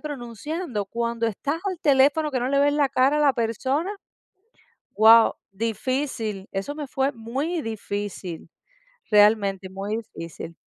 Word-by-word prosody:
pronunciando. 270 - -5
Cuando 235 +2 -2
estás 285 +9 -2
al 370 -4 -2
teléfono, 290 +1 +3
que 255 -3 -1
no 250 - -1
le 280 - +2
ves 285 +1 +4
la 290 -2 +2
cara 270 +3 +2
a - - +1
la 285 -2 +5
persona, 260 - -1 1.0
guau, 225 +1 +7 0.2
difícil. 225 -1 -3
Eso 195 +9 -3
me 295 - -5
fue 270 +1 0
muy 270 +9 -3
difícil. 205 -5 -5 0.6
Realmente, 205 -3 +4
muy 200 +3 -3
difícil. 165 -6 -8
235 Hz, 135 wpm, -24 LUFS, 210-285 Hz, 1.0 s, guau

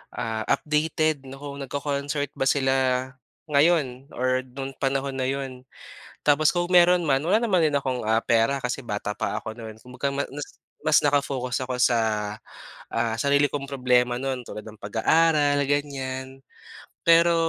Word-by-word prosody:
ah, 110 -2 -3
updated 150 0 0
na 135 - -8
kung 140 0 -8
nagko-concert 140 +1 -3
ba 135 - +1
sila 135 -2 +2 0.8
ngayon 140 -4 +2
or 130 +1 +1
no'n 135 +2 -6
panahon 135 0 0
na 130 - 0
'yon. 130 -1 -4 0.6
Tapos 150 +1 +5
kung 175 -1 0
meron 175 -1 +5
man, 135 -1 +2
wala 185 +7 +3
din 235 - -1
naman 175 -7 +3
akong, 135 -3 -1
ah, 110 +1 +2
pera 115 +3 +2
kasi 125 +1 -3
bata 105 -3 -4
pa - - -2
ako 110 - -7
no'n. 110 -2 -9
Kumbaga 125 +4 -4
ma 140 0 -2
nas 145 +2 -8 0.2
mas 155 0 +5
naka-focus 140 -3 0
ako 125 -1 -3
sa, 120 -1 +4 0.9
ah, 115 -1 0
sarili 140 +3 +3
kong 140 -1 -4
problema 125 -2 +2
no'n 130 -1 -3
tulad 105 - -8
ng 110 -1 -12
pag-aaral, 145 +6 +3
ganyan. 135 -2 -3 0.6
Pero, 170 0 +6
135 Hz, 155 wpm, -25 LUFS, 125-145 Hz, 0.9 s, Pero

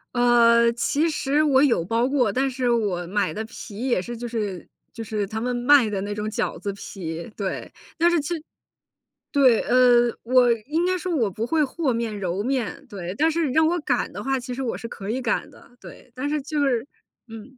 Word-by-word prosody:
呃， 235 -1 +5
其 295 +7 0
实 300 0 +1
我 270 -3 +4
有 240 - +3
包 230 +6 +1
过， 255 -7 +2
但 265 +4 0
是 255 -1 -1
我 200 -7 0
买 205 +2 0
的 220 - -4
皮 225 0 -8
也 185 - +2
是 240 +5 -6
就 240 +1 -6
是 205 -6 -4 0.3
就 230 - -6
是 210 -2 -3
他 220 +2 -4
们 250 +1 -1
卖 245 -1 +4
的 200 -2 -2
那 205 +1 -4
种 210 - -4
饺 - - -2
子 200 - -4
皮， 170 -4 -7
对。 195 -3 -4 0.3
但 340 +1 +4
是 345 - +2
其 345 +5 -3 1.0
对， 260 -6 +5
呃， 245 -1 +5
我 250 0 +4 0.2
应 325 +4 0
该 370 0 +1
说 360 -1 -3
我 225 -7 +1
不 220 +5 -3
会 325 -1 +2
和 275 -2 -1
面、 230 -2 -3
揉 185 +1 -2
面。 255 -2 -3
对。 185 -3 -6
但 320 +2 +3
是 325 -1 0
你 - - -2
让 320 +1 +4
我 350 +1 +1
擀 245 -5 0
的 - - -6
话 270 0 0
其 250 0 -6
实 265 +2 -4
我 240 - -2
是 230 - -7
可 200 -3 -8
以 255 +3 -1
擀 235 - -1
的。 - - -18
对。 - - -13
但 285 +3 -3
是 300 -1 -1
就 295 0 -1
是 245 0 0 0.4
嗯。 225 +4 -11
240 Hz, 230 characters per minute, -24 LUFS, 215-275 Hz, 1.0 s, 呃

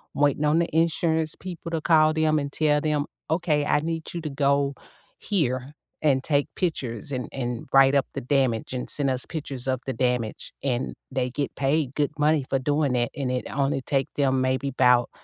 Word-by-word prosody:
waiting 145 0 +2
on 150 +2 +3
the 170 - +1
insurance 160 -1 +1
people 175 -2 -7
to 165 - 0
call 155 -1 +5
them 155 -1 +2
and 140 -1 -4
tell 150 0 +2
them, 150 -2 0 0.2
"Okay, 160 -2 +1
I - - +3
need 165 0 -4
you 170 - -4
to 155 - -4
go 140 0 +1 0.5
here 130 - -1 0.3
and 135 -4 +2
take 145 -1 +1
pictures, 140 - -1
and 125 -1 -3
and 120 -3 -4
write 135 0 +6
up 140 - +2
the - - -4
damage, 130 -3 0
and 125 - -4
send 140 -2 +2
us 130 -1 0
pictures 135 -5 -4
of 130 -1 0
the 130 - -2
damage." 125 -2 -1
And 130 -1 -1 0.2
they 125 -1 -1
get 140 +2 -3
paid 140 0 0
good 150 0 +1
money 150 -2 +3
for 135 - +2
doing 145 0 +1
that, 120 -1 0
and 135 -3 -2
it 125 0 -2
only 135 -1 0
take 135 +1 -1
them 135 -2 +2
maybe 130 +1 0
'bout, 125 -2 +4
140 Hz, 195 wpm, -25 LUFS, 130-155 Hz, 0.5 s, write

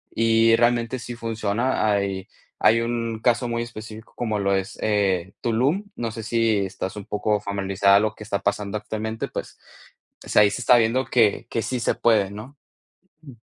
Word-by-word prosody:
y 115 0 +4
realmente 120 +1 +1
sí 120 0 -7
funciona. 115 0 -1
Hay 95 -2 -2 0.3
hay 110 +2 +5
un 115 -1 -2
caso 120 0 +2
muy 115 0 -1
específico 110 -1 -10
como 110 -3 -2
lo 100 0 +1
es 95 0 -3
eh, 95 -3 0
Tulum. 130 - +1
No 115 -2 -3
sé 115 0 -7
si 115 -1 +1
estás 95 0 -5
un 105 - -6
poco 105 0 0
familiarizada 100 0 +2
a - - +5
lo 110 0 -1
que - - -10
está 100 -2 -2
pasando 100 +1 -1
actualmente, 110 +1 -4
pues - - -7 0.6
pues, - - -4
ahí 105 -1 +7
se 110 - -4
está 125 - +6
viendo 115 +3 +2
que 115 -3 +2
que 115 - -1
sí 125 +3 -2
se - - +1
puede, 105 -4 +2
¿no? 110 +7 -10 0.7
M 135 -4 -12
110 Hz, 180 wpm, -23 LUFS, 100-115 Hz, 0.7 s, ahí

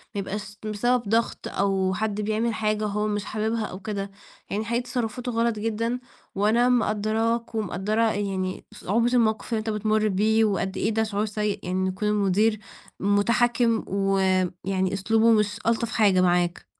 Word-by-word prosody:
ما - - -1
يبقاش 205 +1 -6
بسبب 235 +4 +1
ضغط 230 +2 0
أو 195 -1 0
حد 210 0 -2
بيعمل 220 +2 0
حاجه 215 -1 0
هو 210 +1 -1
مش 205 -2 -2
حاببها 220 +1 -1
أو 185 - -7
كده، 200 0 -4 0.4
يعني 210 +2 -2
حقيقي 235 +2 0
تصرفاته 245 0 -3
غلط 230 -1 0
جدًا، 230 +3 -1 0.4
وأنا 220 +5 +3
مقدراك 225 0 0
ومقدّرة 210 +1 -1
يعني 190 -2 -3
صعوبة 230 +5 0
الموقف 220 -2 +1
اللي 225 - +1
أنت 220 +1 -4
بتمر 215 0 +1
بيه، 215 +3 +3
وقدّ 195 -2 -1
إيه - - +1
ده 220 0 +1
شعور 210 -1 -1
سيء 210 -1 -2
إن 185 +1 0
يكون 190 +3 -2
المدير 210 +1 +2 0.4
متحكم 230 +3 +2
ويعني 190 -1 0
أسلوبه 220 +4 +3
مش 210 -1 +2
ألطف 230 0 +1
حاجه 200 -4 +4
معاك. 175 -1 +1
215 Hz, 155 wpm, -25 LUFS, 195-225 Hz, 0.4 s, حاجه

